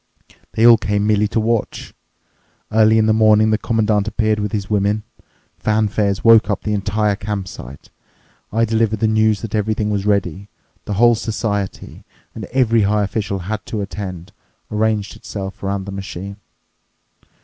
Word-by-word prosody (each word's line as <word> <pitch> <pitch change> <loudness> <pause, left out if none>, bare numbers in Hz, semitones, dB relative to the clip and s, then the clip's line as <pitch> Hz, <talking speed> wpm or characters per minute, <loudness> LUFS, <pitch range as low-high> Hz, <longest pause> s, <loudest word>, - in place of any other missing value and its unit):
They 115 - +2
all 120 -1 +8
came 105 -1 -1
merely 105 0 +2
to 115 - -1
watch. 115 0 -2 0.8
Early 110 0 +4
in 110 - +3
the 110 - +3
morning 110 0 +4
the 110 - +1
Commandant 110 -2 0
appeared 110 -1 0
with 105 0 -2
his 100 -2 -3
women. 105 0 0 0.6
Fanfares 105 -2 0
woke 115 -2 +6
up 100 - -2
the 105 - -1
entire 105 0 0
campsite. 95 - -7 0.6
I 115 +2 +2
delivered 110 -1 0
the 110 - +2
news 110 -1 +2
that 115 - -6
everything 105 0 -1
was 100 0 -2
ready. 100 -1 -1 0.4
The 105 - -3
whole 120 +3 +5
society—and 105 -3 -5
every 120 -3 +2
high 105 +1 +2
official 100 -1 -2
had 105 +1 -4
to 110 -4 -3
attend—arranged 100 +2 -4
itself 100 -3 -7
around 100 0 -3
the 100 - -7
machine. 95 0 -7
105 Hz, 150 wpm, -19 LUFS, 100-110 Hz, 0.8 s, all